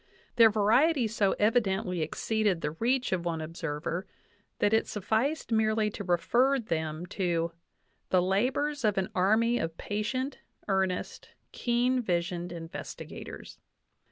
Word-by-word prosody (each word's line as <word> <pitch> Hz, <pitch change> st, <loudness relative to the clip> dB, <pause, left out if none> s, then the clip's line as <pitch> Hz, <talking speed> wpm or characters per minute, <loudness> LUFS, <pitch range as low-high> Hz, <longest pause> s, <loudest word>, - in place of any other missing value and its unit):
Their 230 Hz, -2 st, +8 dB
variety 235 Hz, +6 st, +3 dB
so 210 Hz, -2 st, +1 dB
evi 225 Hz, +4 st, +4 dB
dently 190 Hz, -3 st, -2 dB
exceeded 205 Hz, +3 st, 0 dB
the 150 Hz, -, -1 dB
reach 245 Hz, -, 0 dB
of 185 Hz, -2 st, 0 dB
one 170 Hz, -2 st, -2 dB
observer 165 Hz, +2 st, -4 dB, 0.5 s
that 205 Hz, -, +2 dB
it 220 Hz, -, +3 dB
sufficed 225 Hz, -, -1 dB
merely 215 Hz, -1 st, +2 dB
to 205 Hz, -, -6 dB
refer 240 Hz, +10 st, +2 dB
them 160 Hz, -7 st, -3 dB
to 170 Hz, -3 st, -1 dB, 0.6 s
"the 185 Hz, -, +4 dB
labors 250 Hz, +11 st, 0 dB
of 210 Hz, -2 st, +2 dB
an 190 Hz, -1 st, 0 dB
army 220 Hz, +6 st, +3 dB
of 165 Hz, 0 st, -3 dB
patient, 255 Hz, +6 st, -3 dB, 0.3 s
earnest, 190 Hz, -2 st, -1 dB, 0.2 s
keen 245 Hz, +1 st, +1 dB
visioned 175 Hz, -3 st, -2 dB
investigators." 170 Hz, +2 st, -8 dB
205 Hz, 130 wpm, -29 LUFS, 175-230 Hz, 0.6 s, Their